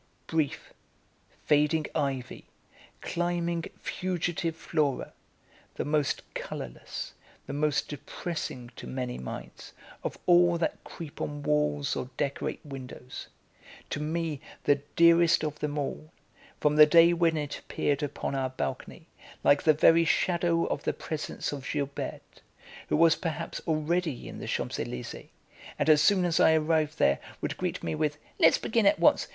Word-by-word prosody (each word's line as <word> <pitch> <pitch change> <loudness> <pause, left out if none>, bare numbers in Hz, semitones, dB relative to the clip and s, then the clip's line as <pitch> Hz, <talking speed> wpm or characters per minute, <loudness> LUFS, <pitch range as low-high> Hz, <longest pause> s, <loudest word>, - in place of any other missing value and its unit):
Brief, 160 -3 -2 0.7
fading 150 +1 +3
ivy, 135 -4 -2 0.6
climbing, 170 -1 -1
fugitive 175 -2 -2
flora, 150 -4 -1 0.6
the - - -2
most 150 -2 0
colourless, 65 -2 -6 0.3
the - - -6
most 150 0 +1
depressing, 145 -4 -5
to - - -8
many 125 -1 -4
minds, 65 - -8 0.3
of - - -3
all 175 -1 +5
that 165 - -2
creep 160 -4 -9
on 145 0 -4
walls 150 -1 +1
or 125 - -4
decorate 140 +2 -2
windows; 130 -2 -8 0.6
to - - -2
me 155 -1 -2 0.2
the 145 - +4 0.2
dearest 170 -1 +6
of 150 -1 -3
them 150 0 -2
all, 150 +2 -4 0.5
from 150 0 +2
the 150 0 +10
day 170 +2 +7
when 165 -2 +2
it 145 -1 -3
appeared 145 0 -1
upon 145 -1 -3
our 135 -1 0
balcony, 130 - -5 0.4
like 145 - +5
the 155 - +5
very 165 +2 +5
shadow 170 0 +2
of - - -2
the - - -1
presence 155 -1 -4
of 140 -2 -6
Gilberte, 140 -2 -4 0.5
who - - +2
was 165 0 +6
perhaps 165 -1 -4
already 160 -2 0
in - - -8
the - - -6
Champs - - -2
Elysées, 60 - -5 0.5
and - - +1
as 150 -1 +7
soon 185 +3 +4
as 170 -2 +1
I 160 - +6
arrived 155 0 +1
there 70 0 +3 0.2
would - - -3
greet - - -3
me 80 - -1
with: 145 - -1 0.2
"Let's 165 - +6
begin 220 -2 +2
at 310 - +5
once. - - +4
155 Hz, 145 wpm, -28 LUFS, 145-165 Hz, 0.7 s, the